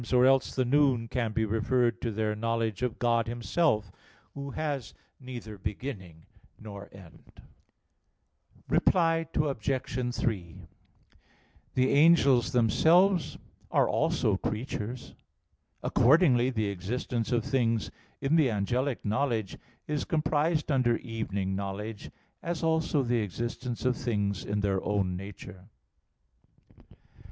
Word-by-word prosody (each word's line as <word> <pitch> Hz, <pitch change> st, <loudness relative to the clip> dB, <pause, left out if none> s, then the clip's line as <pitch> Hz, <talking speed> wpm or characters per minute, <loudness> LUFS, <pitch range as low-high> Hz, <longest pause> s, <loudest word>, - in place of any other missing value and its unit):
Or 125 Hz, 0 st, +5 dB
else 135 Hz, 0 st, +3 dB
the 130 Hz, -, +1 dB
noon 130 Hz, -3 st, +3 dB
can 115 Hz, -2 st, -1 dB
be 110 Hz, +1 st, 0 dB
referred 115 Hz, +2 st, +1 dB
to 115 Hz, -, -1 dB
their 105 Hz, 0 st, -1 dB
knowledge 115 Hz, 0 st, -1 dB
of 125 Hz, -3 st, -1 dB
God 115 Hz, -1 st, +1 dB
Himself, 120 Hz, -, 0 dB, 0.4 s
Who 140 Hz, 0 st, -6 dB
has 145 Hz, -4 st, -4 dB, 0.2 s
neither 120 Hz, -6 st, -8 dB
beginning 95 Hz, -, -6 dB, 0.3 s
nor 100 Hz, -2 st, -9 dB
end. 95 Hz, -4 st, -16 dB, 1.3 s
Reply 165 Hz, -2 st, +2 dB
Obj. 130 Hz, -3 st, -1 dB
3: 90 Hz, -7 st, -2 dB, 1.2 s
The 130 Hz, 0 st, +3 dB
angels 140 Hz, -5 st, +5 dB
themselves 165 Hz, -, +3 dB, 0.3 s
are -, -, +3 dB
also -, -, +1 dB
creatures. 115 Hz, +1 st, -4 dB, 0.7 s
Accordingly 130 Hz, -3 st, +4 dB
the 110 Hz, -5 st, -1 dB
existence 115 Hz, +5 st, -3 dB
of 120 Hz, -1 st, +1 dB
things 120 Hz, -5 st, 0 dB, 0.3 s
in 140 Hz, +3 st, +2 dB
the 150 Hz, -5 st, +4 dB
angelic 120 Hz, +5 st, -1 dB
knowledge 110 Hz, -2 st, -1 dB, 0.3 s
is 150 Hz, -1 st, -2 dB
comprised 155 Hz, 0 st, 0 dB
under 125 Hz, -4 st, +3 dB
evening 100 Hz, -5 st, -3 dB
knowledge, 100 Hz, +2 st, -5 dB, 0.3 s
as 170 Hz, -1 st, -3 dB
also 160 Hz, -3 st, +1 dB
the 120 Hz, -1 st, +1 dB
existence 120 Hz, +5 st, -4 dB
of 125 Hz, -1 st, +2 dB
things 100 Hz, -6 st, -2 dB
in 105 Hz, 0 st, -2 dB
their 100 Hz, -2 st, 0 dB
own 100 Hz, -3 st, 0 dB
nature. 95 Hz, 0 st, -10 dB
120 Hz, 115 wpm, -29 LUFS, 105-135 Hz, 1.3 s, Or